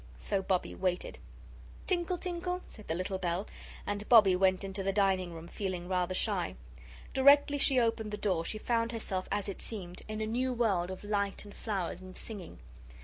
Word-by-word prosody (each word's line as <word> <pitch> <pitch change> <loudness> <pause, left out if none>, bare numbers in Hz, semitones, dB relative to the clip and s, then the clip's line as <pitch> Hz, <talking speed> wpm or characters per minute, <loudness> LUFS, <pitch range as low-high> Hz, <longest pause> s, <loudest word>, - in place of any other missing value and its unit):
So 195 - -1
Bobbie 185 -1 0
waited. 180 -1 -2 0.7
"Tinkle, 355 -1 0
tinkle," 360 0 -3
said 215 - -12
the 160 - -1
little 185 +2 -2
bell, 180 +2 -1 0.4
and 205 0 -3
Bobbie 210 -6 +8
went 185 +1 +3
into 195 0 -3
the 195 0 +1
dining 190 -3 +2
room, 165 0 -8
feeling 185 -2 -4
rather 185 0 0
shy. - - +1 0.6
Directly 285 +1 +6
she 270 -2 +5
opened 225 -2 +1
the 210 - -4
door 185 -6 0
she 215 - -4
found 230 +1 0
herself, 190 -5 -3
as 205 0 0
it 200 - -5
seemed, 185 -5 -6
in 215 0 -4
a 220 - 0
new 250 +4 0
world 200 -7 +1
of 185 +1 -7
light 200 -1 -1
and 205 - -11
flowers 190 -5 -3
and 185 0 -10
singing. 205 - -7
200 Hz, 185 wpm, -32 LUFS, 185-230 Hz, 0.7 s, Bobbie